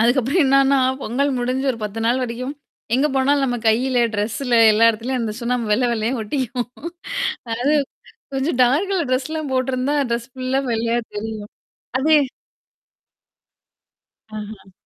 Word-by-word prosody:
அதுக்கப்புறம் 260 +8 +3
என்னன்னா, 275 0 +4 0.2
பொங்கல் 275 +5 0
முடிஞ்சு 255 +2 -1
ஒரு 230 - -9
10 210 +2 -4
நாள் 250 +2 +2
வரைக்கும் 250 +4 -5 0.4
எங்க 270 +4 +3
போனாலும் 275 +1 +3
நம்ம 245 -1 -1
கையில, 245 +2 +2
ட்ரெஸ்ல 225 +5 -1 0.2
எல்லா 230 +2 +5
இடத்துலயும் 240 +3 -3
அந்த 220 -2 -2
சுண்ணாம்ப 235 -2 -1
வெள்ள 245 +4 +2
வெள்ளையா 225 +1 -1
ஒட்டிக்கும். 245 +1 -3 0.8
அதாவது 250 +7 +1 0.6
கொஞ்சம் 270 0 -1
டார்க் 285 +11 +2
கலர் 350 -8 0
ட்ரெஸ்லாம் 290 +3 -2
போட்டருந்தா, 260 +2 0 0.2
ட்ரெஸ் 235 +1 -2
ஃபுல்லா 260 +1 -1
வெள்ளையா 230 +1 0 0.2
தெரியும். 215 0 -5 0.5
அது 290 +4 +1 2.2
அஹ்ம். 210 -2 -8
250 Hz, 130 wpm, -21 LUFS, 230-270 Hz, 2.2 s, எல்லா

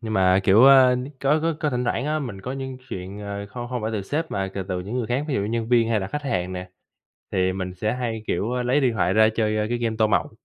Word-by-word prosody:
Nhưng 110 -2 -5
mà 95 -1 +4
kiểu, 100 +6 +6
ơ, 130 -2 +7 0.2
có 145 +3 +3
có 165 -1 +1
có 150 - 0
thỉnh 125 0 -1
thoảng 120 +1 -1
á, 155 +1 0
mình 115 -9 -6
có 125 - -5
những 130 -1 -5
chuyện, 95 +1 -6
à, 100 0 -5
không 120 +2 -6
không 125 -3 -3
phải 110 - -1
từ 105 - -2
sếp 155 - -3
mà 95 -1 -2
c - - -13
từ 95 - -2
từ 90 -1 -2
những 100 +6 -6
người 115 - -2
khác, 130 +4 -1
ví 135 - -1
dụ - - +1
như 100 - -2
nhân 115 0 -2
viên 115 -2 +3
hay 110 - +2
là 95 - -3
khách 150 +7 -4
hàng 95 -10 -2
nè, 90 0 -6 0.6
thì 95 0 +1
mình 95 -1 -4
sẽ 105 +5 -1
hay, 115 -3 -3
kiểu, 105 +7 -1
ơ, 125 0 -1
lấy 125 +4 +2
điện 125 -3 +2
thoại 95 -4 +1
ra 110 +1 +5
chơi, 110 -1 +1
ơ, 105 - 0
cái 120 - 0
game 115 -2 -1
tô 110 - +4
màu. 100 - +1
110 Hz, 305 wpm, -23 LUFS, 100-125 Hz, 0.6 s, ơ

